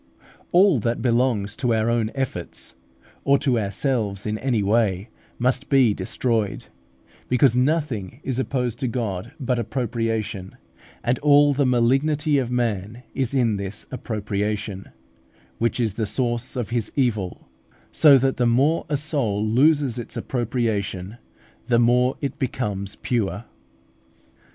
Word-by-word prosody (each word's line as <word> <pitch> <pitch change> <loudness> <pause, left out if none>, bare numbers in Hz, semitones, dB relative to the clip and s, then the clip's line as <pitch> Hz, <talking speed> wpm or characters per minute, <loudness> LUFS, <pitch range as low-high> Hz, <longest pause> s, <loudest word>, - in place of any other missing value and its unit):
All 180 -5 +5
that 115 +2 -2
belongs 115 -4 +1
to 125 -3 +1
our 110 0 +1
own 115 -2 +1
efforts, 130 -10 -4 0.5
or 140 0 +4
to 130 -4 +1
ourselves 100 -1 -1
in 110 0 -2
any 120 -6 0
way, 100 -1 +1 0.3
must 125 +2 0
be 130 -6 +4
destroyed, 110 +2 -1 0.6
because 125 -1 +4
nothing 125 - 0
is 130 -1 -2
opposed 125 -3 -2
to 130 - -1
God 115 -1 -3
but 125 -3 0
appropriation, 115 -4 -3 0.5
and 120 +1 +1
all 145 0 +5
the 140 -1 +1
malignity 140 +5 +2
of 125 -3 -2
man 115 -2 -2
is 135 0 -1
in 115 -5 +2
this 100 +1 -5
appropriation, 105 -4 -3 0.7
which 115 +2 0
is 110 -4 0
the 110 0 -2
source 120 +3 -1
of 120 -3 -3
his 115 -3 -1
evil; 110 -9 -1 0.4
so 145 -3 +7
that 135 +1 +1
the 120 - +2
more 140 +9 +2
a 145 - +1
soul 135 -9 -1
loses 135 +2 +3
its 120 - -7
appropriation, 110 -5 -2 0.5
the 120 - +3
more 125 +2 +3
it 145 +1 -4
becomes 105 -7 -2
pure. 115 -2 -2
120 Hz, 135 wpm, -23 LUFS, 105-130 Hz, 0.7 s, so